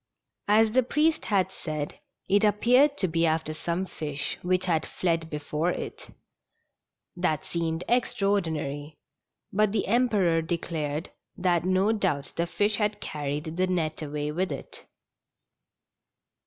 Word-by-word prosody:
As 215 +1 +5
the 255 +3 +4
priest 300 +6 +1
had 190 -3 +2
said, 155 -5 -5 0.3
it 205 +2 +3
appeared 250 +7 +4
to 190 - +1
be 165 0 +2
after 155 -1 0
some 170 +4 -2
fish 150 -5 -4
which 185 +1 +1
had 165 -4 +1
fled 165 -2 -1
before 150 +2 -1
it. - - -5 1.1
That 175 -5 0
seemed 165 0 -2
extraordinary, 160 - 0 0.6
but 210 +1 +3
the 210 - +1
Emperor 200 -8 +3
declared 160 -2 -3 0.3
that 175 -3 +1
no 185 +3 +3
doubt 185 -10 -1
the 170 +1 0
fish 205 +3 +1
had 210 -1 0
carried 150 0 -4
the 185 0 +2
net 165 -4 -1
away 150 0 -3
with 180 +4 -1
it. - - -8
175 Hz, 130 wpm, -27 LUFS, 155-205 Hz, 1.1 s, As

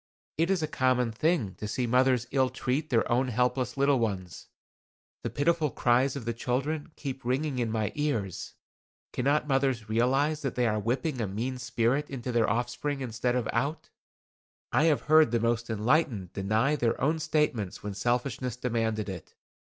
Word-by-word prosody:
It 165 +2 +2
is 190 -4 +1
a - - 0
common 125 -3 +1
thing 130 - 0
to 105 - -4
see 120 +4 -1
mothers 125 0 +3
ill 130 -1 +2
treat 135 +4 -2
their 115 -4 +2
own 125 +2 +2
helpless 125 +1 0
little 140 -1 +3
ones. 95 -6 -3 0.7
The - - -3
pitiful 160 +1 +1
cries 130 +2 +2
of 135 -5 -6
the 115 - -1
children 140 +7 -2
keep 135 -2 -6
ringing 130 +2 -1
in 120 -2 0
my 110 -2 -1
ears. 115 - -2 0.6
Cannot 145 +4 +1
mothers 135 -5 0
realize 135 +7 +2
that 135 -4 -3
they 125 - +2
are 110 -2 +1
whipping 125 - -1
a 110 - -1
mean 120 +7 -3
spirit 125 +4 0
into 130 -2 -4
their 115 -2 +2
offspring 125 +5 -2
instead 120 0 -1
of 125 -3 0
out. 150 +4 -2 0.8
I 155 - +3
have 155 -3 +3
heard 155 -1 +5
the 115 0 +1
most 115 +1 0
enlightened 110 - +1
deny 110 +9 +1
their 120 -5 0
own 155 +5 +1
statements 135 - -1
when 105 -1 -4
selfishness 120 +3 -1
demanded 115 -3 -1
it. 95 -4 -8
125 Hz, 170 wpm, -28 LUFS, 115-140 Hz, 0.8 s, heard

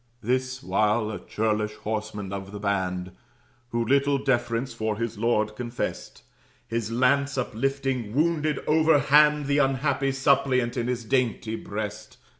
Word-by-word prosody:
This 130 +2 -1
while, 110 +1 +1
a 105 - -5
churlish 105 -1 -1
horseman 105 -2 -4
of 100 0 -6
the 105 - -7
band, 95 -3 -1 0.6
Who 115 -1 -1
little 140 +3 +3
deference 120 -2 0
for 110 -2 -2
his 115 -2 -3
lord 110 -2 +1
confest, 120 +1 -5 0.4
His 115 -1 -2
lance 140 +3 +2
uplifting, 130 -1 -2
wounded 155 -1 +1
overhand 150 -1 +4
The 140 +1 +2
unhappy 135 0 +1
suppliant 135 -3 +2
in 120 -2 -1
his 125 -2 -2
dainty 115 -3 0
breast. 105 -1 -6
120 Hz, 130 wpm, -26 LUFS, 110-135 Hz, 0.6 s, overhand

